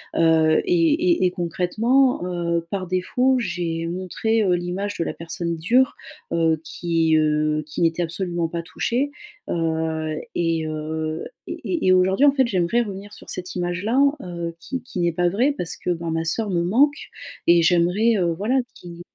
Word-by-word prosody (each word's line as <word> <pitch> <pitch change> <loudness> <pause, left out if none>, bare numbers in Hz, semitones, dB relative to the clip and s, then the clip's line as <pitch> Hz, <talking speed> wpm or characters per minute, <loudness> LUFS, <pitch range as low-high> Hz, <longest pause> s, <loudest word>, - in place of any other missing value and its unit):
heu, 160 -1 +4
et 335 -3 +3
et 340 - +2
et 180 - +2
concrètement, 205 +8 +1
heu, 170 -2 -1
par 190 -1 -3
défaut, 250 +9 +1
j'ai 170 -5 -2
montré, 185 +5 -1
heu, 185 -3 +2
l'image 180 +4 -2
de 165 - 0
la - - -4
personne 170 0 -3
dure, 245 +11 +2 0.4
heu, 160 -2 +1
qui, 165 -1 +1
heu, 155 0 +1
qui 150 - -5
n'était 165 +1 +2
absolument 175 0 -2
pas 170 +1 -4
touchée, 240 +10 -1 0.4
heu, 160 -1 -1 0.2
et 165 -2 0
heu, 155 +1 -4 0.2
et 335 - -3
et 185 - +6
aujourd'hui, 190 +9 +4
en - - +7
fait, 270 -2 +2
j'aimerais 190 +3 +1
revenir 205 -2 -6
sur - - -12
cette 180 0 -6
image-là, 180 +8 -1 0.2
heu, 170 -2 -5
qui 260 +8 -5
qui 215 -7 -6
n'est 175 0 +2
pas 175 +1 +2
vraie 240 +10 +2
parce 175 - -3
que - - -5
ben 170 -1 -2
ma 165 0 -1
sœur 205 +5 -1
me 175 -2 +1
manque 265 - +2 0.4
et 170 0 +6
j'aimerais, 180 +7 +3
heu, 175 -2 +1
voilà, 205 +8 -3 0.2
qui 175 -1 -11
175 Hz, 170 wpm, -22 LUFS, 165-205 Hz, 0.4 s, en